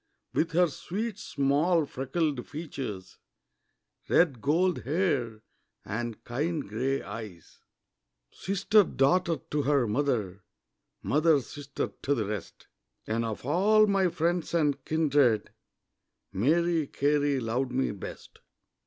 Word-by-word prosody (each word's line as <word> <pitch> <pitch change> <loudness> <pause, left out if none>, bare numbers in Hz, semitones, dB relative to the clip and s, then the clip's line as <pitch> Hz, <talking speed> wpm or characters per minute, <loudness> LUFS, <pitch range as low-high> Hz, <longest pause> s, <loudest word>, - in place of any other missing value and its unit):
With 165 +1 0
her 180 +2 +5
sweet 205 +7 -4
small 150 +4 +1
freckled 135 0 -2
features, 135 - -7 0.9
Red 145 -9 +3
gold 170 - +2
hair, 135 - -1 0.4
and 115 +1 -4
kind 150 +4 -2
grey 130 +6 -1
eyes; 105 -5 -9 0.7
Sister, 200 +2 +3
daughter, 165 +2 +2
to 150 - +1
her 140 -2 +2
mother, 105 -6 -1 0.6
Mother, 155 0 +3
sister, 140 +2 -5
to 145 - +1
the 110 -5 -1
rest 105 -2 -6 0.4
And 115 +2 -1
of 115 0 -5
all 205 +9 +4
my 195 -2 +2
friends 170 0 -1
and 150 -4 +1
kindred, 145 -8 +2 0.8
Mary 160 - +2
Carey 145 0 +1
loved 125 +2 -1
me 130 +1 0
best. 100 - -9
145 Hz, 110 wpm, -28 LUFS, 120-170 Hz, 0.9 s, her